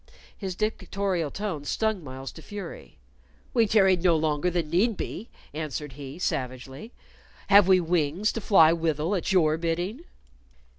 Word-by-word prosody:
His 190 -3 -5
dictatorial 195 -5 -2
tone 190 -5 -4
stung 220 +4 -1
Myles 130 -1 -7
to 160 - -12
fury. 205 +4 -9 0.6
"We 230 -3 +3
tarried 190 -4 +4
no 175 -2 +4
longer 155 +1 0
than 170 -3 -2
need 200 +5 +2
be," 225 - -6 0.2
answered 150 -2 -5
he, 140 +2 -9
savagely. 130 - -4 0.6
"Have 200 -1 +7
we 190 -1 +6
wings 170 +3 0
to 225 - -5
fly 165 -6 +6
withal 165 +1 -1
at 190 +1 -1
your 160 -4 +3
bidding?" 175 - -3
175 Hz, 145 wpm, -26 LUFS, 155-200 Hz, 0.6 s, Have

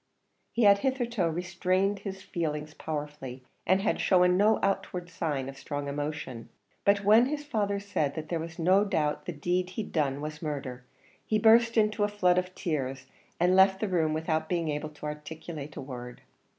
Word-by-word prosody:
He 235 - +1
had 200 -1 +7
hitherto 240 -7 0
restrained 185 +3 0
his 195 -1 -7
feeling 155 -6 -2
powerfully, 145 -4 -5 0.2
and 190 +2 +3
had - - +1
shown 180 -1 +4
no 210 +4 +4
outward 180 -2 -1
signs 150 -6 -2
of 135 0 -8
strong 145 -1 -4
emotion; 140 -4 -4 0.4
but 200 0 +4
when 220 +5 +6
his 295 +1 -3
father 205 -7 -1
said 155 -8 -1
that 155 -1 -5
there 170 0 -2
was 165 +1 -7
no 185 +4 +4
doubt 160 -8 -1
the - - -1
deed 180 +4 -1
he'd 200 +3 -5
done 140 -4 0
was 150 +1 -6
murder, 135 -5 -4 0.4
he 215 - +1
burst 230 +2 +5
into 215 -1 +3
a - - +3
flood 180 -3 +3
of 185 0 -6
tears, 135 -7 -3 0.3
and 180 +2 +4
left 190 0 +5
the 215 - -1
room 165 -5 +1
without 160 0 -1
being 170 -3 0
able 150 +1 -3
to 150 0 -11
articulate 150 0 -7
a - - -5
word. 125 -2 -8
175 Hz, 180 wpm, -29 LUFS, 150-200 Hz, 0.4 s, had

